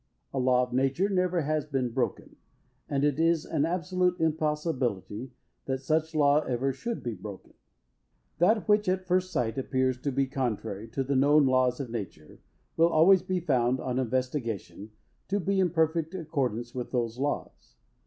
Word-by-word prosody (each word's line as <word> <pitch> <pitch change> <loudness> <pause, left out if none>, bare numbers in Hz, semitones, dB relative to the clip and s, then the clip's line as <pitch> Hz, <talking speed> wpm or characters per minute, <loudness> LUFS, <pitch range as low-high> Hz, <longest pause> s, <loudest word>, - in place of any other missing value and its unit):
A 135 - -1
law 125 0 +3
of 125 0 -5
nature 135 +9 +1
never 180 -2 +1
has 155 0 -1
been 130 -4 -1
broken. 130 +1 -3 0.5
And 140 -1 0
it 145 0 +1
is 165 -1 +2
an 150 -2 0
absolute 180 +1 0
impossibility 150 - -1 0.4
that 130 0 -3
such 160 +3 0
law 145 -1 +4
ever 135 -1 -1
should 230 - -5
be 120 - -3
broken. 100 0 -10 0.9
That 215 +6 +3
which, 210 -2 +3
at 185 0 -1
first 185 0 +1
sight, 115 0 -1
appears 130 -1 0
to 140 - -1
be 135 +1 +1
contrary 115 -6 -3
to 130 +4 -2
the 135 +1 -1
known 145 +2 +5
laws 130 -1 +2
of 130 -5 -5
nature, 95 -9 -7 0.4
will 165 +1 +4
always 170 +4 +5
be 185 -1 -2
found, 130 -5 +1
on 130 0 -2
investigation, 120 - -3 0.4
to 200 +2 0
be 195 +1 0
in 185 -2 +3
perfect 160 +1 0
accordance 130 - -2
with 125 -1 -4
those 120 -1 -2
laws. 145 +1 -4
140 Hz, 165 wpm, -28 LUFS, 125-165 Hz, 0.9 s, known